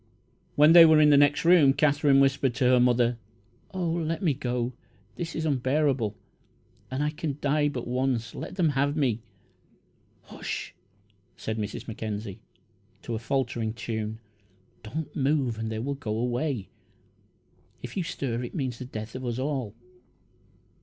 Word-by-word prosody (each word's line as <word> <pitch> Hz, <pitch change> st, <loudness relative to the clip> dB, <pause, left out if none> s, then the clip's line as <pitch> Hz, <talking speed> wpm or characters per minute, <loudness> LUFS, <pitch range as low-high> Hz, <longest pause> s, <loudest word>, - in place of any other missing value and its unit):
When 150 Hz, +2 st, +6 dB
they 170 Hz, -1 st, +11 dB
were 160 Hz, -1 st, +6 dB
in 150 Hz, -1 st, +6 dB
the -, -, +7 dB
next 145 Hz, +2 st, +4 dB
room, 165 Hz, -6 st, +6 dB
Katherine 145 Hz, -1 st, +3 dB
whispered 135 Hz, -2 st, +2 dB
to 130 Hz, -1 st, +1 dB
her 125 Hz, 0 st, +5 dB
mother: 120 Hz, -1 st, +2 dB, 0.5 s
"Oh, 185 Hz, -2 st, -2 dB
let 165 Hz, +1 st, -2 dB
me 160 Hz, -5 st, +3 dB
go! 125 Hz, -1 st, -2 dB, 0.4 s
This 170 Hz, -1 st, -5 dB
is 160 Hz, -, -2 dB
unbearable, 135 Hz, -5 st, +1 dB, 0.7 s
and 130 Hz, +3 st, -2 dB
I 150 Hz, -, 0 dB
can 150 Hz, -2 st, -4 dB
die 145 Hz, +1 st, +1 dB
but 125 Hz, -4 st, -5 dB
once 125 Hz, -2 st, -1 dB
let -, -, -7 dB
them 175 Hz, -5 st, +2 dB
have 145 Hz, +1 st, 0 dB
me!" 120 Hz, -6 st, +1 dB, 1.0 s
"Hush," -, -, -6 dB, 0.6 s
sang 110 Hz, 0 st, -4 dB
Mrs. 105 Hz, -2 st, -5 dB
Mackenzie, 105 Hz, -2 st, -5 dB, 0.6 s
to 120 Hz, -, -5 dB
a 110 Hz, -, -2 dB
faltering 120 Hz, -2 st, -1 dB
tune. 110 Hz, -1 st, -4 dB, 0.6 s
"Don't 140 Hz, +9 st, -6 dB
move 135 Hz, -5 st, 0 dB
and 110 Hz, 0 st, -3 dB
they 110 Hz, -, -3 dB
will 135 Hz, +6 st, -2 dB
go 115 Hz, -6 st, -4 dB
away. 125 Hz, -2 st, -2 dB, 1.1 s
If -, -, -7 dB
you 195 Hz, -, 0 dB
stir 135 Hz, -9 st, -3 dB
it 120 Hz, -, -7 dB
means 130 Hz, -6 st, -3 dB
the 125 Hz, -, -6 dB
death 110 Hz, -2 st, -7 dB
of 130 Hz, -, -6 dB
us 120 Hz, -1 st, -3 dB
all!" 130 Hz, -6 st, -3 dB
130 Hz, 155 wpm, -27 LUFS, 115-150 Hz, 1.1 s, they